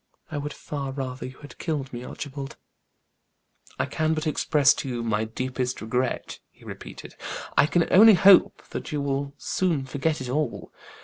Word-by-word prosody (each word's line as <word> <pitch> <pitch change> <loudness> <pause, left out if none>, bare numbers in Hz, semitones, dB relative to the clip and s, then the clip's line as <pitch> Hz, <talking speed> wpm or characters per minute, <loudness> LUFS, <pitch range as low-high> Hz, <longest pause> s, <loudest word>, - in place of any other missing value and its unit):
I 150 - -2
would 145 +1 -4
far 140 -3 -5
rather 130 -2 -5
you 130 - -11
have 145 - -12
killed 145 -6 -3
me, 120 0 -5
Archibald." 140 +1 -7 1.2
"I - - +1
can 155 0 0
but 155 +1 -3
express 150 -1 +3
to 135 - -5
you 120 -2 -3
my 110 -1 0
deep 130 +4 -5
regret," 125 0 -2
he - - -21
repeated. - - -9 0.4
"I 145 - +5
can 170 +1 +2
only 215 +2 +9
hope 190 +1 +6 0.3
you 150 - -1
will 140 0 -2
soon 165 -4 0
forget 145 +3 -1
it 130 - -5
all. 140 0 -2
140 Hz, 165 wpm, -25 LUFS, 130-155 Hz, 1.2 s, only